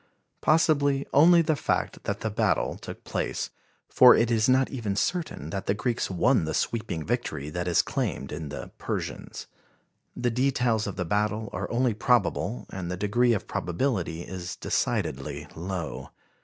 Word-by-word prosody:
Possibly 145 -3 +3
only 170 +4 +7
the 155 -1 +1
fact - - -2
that - - -2
the - - -2
battle - - +1
took - - -9
place, - - -3 0.4
for 125 -1 +8
it 115 +1 +2
is 115 +1 +3
not 130 +1 +3
even 110 -7 -2
certain 155 - -2
that 95 0 -4
the 100 - +2
Greeks 115 +4 -1
won 90 -3 +3
the 80 0 -2
sweeping 105 -9 -2
victory 70 +2 -2
that 90 +2 -3
is 85 - +3
claimed - - -3
in 80 -3 -5
the 75 - -7
"Persians." - - -5 0.7
The 120 -1 0
details 125 -3 +1
of 100 - -4
the 90 - -2
battle 105 +4 -1
are - - -3
only 120 0 +1
probable, 115 - +1
and 95 -2 -5
the 90 - -3
degree 120 +5 +2
of 105 - -2
probability 90 - -1
is 90 -1 -6
decidedly - - -2
low. 90 -1 -5
110 Hz, 160 wpm, -27 LUFS, 90-125 Hz, 0.7 s, for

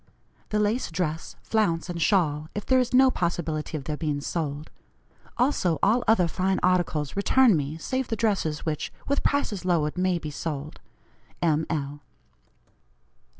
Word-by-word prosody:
"The 210 - 0
lace 210 +4 +1
dress, 165 -1 -3
flounce, 175 -8 0
and 175 -2 -4
shawl, 155 -5 +2
if 210 - -4
there 260 -1 +4
is 250 - 0
no 260 +1 +6
possibility 165 -4 -2
of 140 - -7
their 150 +2 -4
being 150 -3 -1
sold. 150 -1 -4 0.7
Also 220 - +2
all 235 +5 +3
other 210 -6 +4
fine 190 +3 0
articles 175 -5 +1
return 225 +2 +4
me, 150 +1 -2
save 260 +9 -2
the 225 - -1
dresses 200 -9 -1
which, 155 -2 -2 0.2
with 280 - +1
prices 220 -10 0
lowered, 170 -2 0
may 185 -1 +2
be 155 -3 -6
sold. 150 0 -5 0.6
"M. 160 -2 +1
L." 145 -2 -3
170 Hz, 150 wpm, -26 LUFS, 155-210 Hz, 0.7 s, no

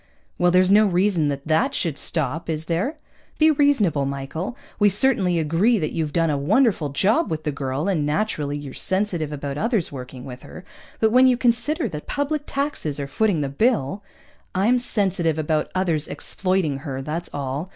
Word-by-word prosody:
"Well, 175 - +4
there's 185 +1 +4
no 210 +1 +6
reason 180 -3 +2
that 140 -1 -3
that 160 0 +2
should 165 -5 -1
stop, 160 0 -2
is 160 0 -2
there? 180 - -1 0.4
Be 315 0 +5
reasonable, 220 - +2
Michael. 140 - -5 0.2
We 205 -1 +5
certainly 200 -4 +2
agree 165 +9 +2
that 155 -6 -2
you've 160 -3 -2
done 165 0 +1
a 145 - -1
wonderful 195 - +2
job 205 - +1
with 155 -1 -3
the 150 - -1
girl, 140 +3 -3
and 180 -7 +1
naturally 150 -2 -1
you're 145 -2 -8
sensitive 185 -6 -1
about 140 -1 -4
others 225 -6 0
working 125 -2 -8
with 125 -1 -9
her. 180 - -11 0.3
But 220 -1 +3
when 255 +2 +6
you 250 -1 +3
consider 250 +7 +1
that 150 -1 -7
public 290 +1 -2
taxes 275 - -2
are 140 - -2
footing 175 +4 0
the 140 - -1
bill 190 - 0 0.3
" - - -33
"I'm 225 +7 +3
sensitive 185 -9 0
about 155 0 0
others 170 -5 0
exploiting 185 -7 -1
her, 135 -2 -5
that's 160 +4 -4
all. 140 +5 -4
170 Hz, 185 wpm, -23 LUFS, 145-215 Hz, 0.4 s, no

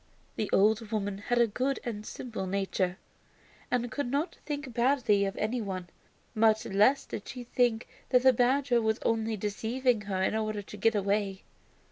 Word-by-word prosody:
The 215 - -2
old 215 +2 +3
woman 205 -2 -2
had 240 +4 -1
a 240 - +6
good 255 +5 -1
and 215 -3 -4
simple 225 -6 -5
nature, 190 -1 -1 0.7
and 245 -2 0
could 285 -4 -2
not 285 +7 -1
think 290 -4 -4
badly 235 -5 +3
of 195 - -4
any 230 +3 -1
one. 185 -4 -5 0.4
Much 220 0 +3
less 210 +8 +3
did 205 - -7
she 250 -2 -7
think 240 -1 +1 0.2
that 250 -1 +4
the 260 -1 +7
badger 250 0 +2
was 220 0 +1
only 225 -1 0
deceiving 220 +4 0
her 195 -2 -2
in 200 - +1
order 215 -1 -2
to 205 - -10
get 220 +2 +2
away. 200 -1 0
220 Hz, 170 wpm, -29 LUFS, 205-245 Hz, 0.7 s, the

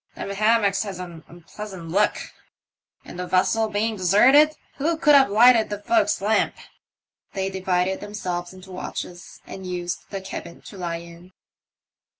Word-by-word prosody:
Them 200 - -5
hammocks 205 -1 +2
has 200 -4 -5
an 175 -3 -9
onpleasant 175 +1 -9
look... 205 +5 +2 0.9
and 175 - -10
the 180 - -4
vessel 220 +5 +2
being 215 +1 -1
desarted, 260 - +5 0.2
who 320 +4 0
could 300 -2 +4
have 275 -4 +6
lighted 225 +2 +5
the 205 - -3
fo'ksle 320 - +1
lamp? 215 +2 +1 0.4
" - - -49
They 190 0 -2
divided 190 0 0
themselves 180 -4 -4
into 185 0 -13
watches, 180 -1 -7
and 190 - -9
used 175 -1 -5
the 195 - -4
cabin 190 -2 -8
to - - -12
lie 170 -2 -3
in. 170 +2 -13
195 Hz, 155 wpm, -23 LUFS, 180-220 Hz, 0.9 s, have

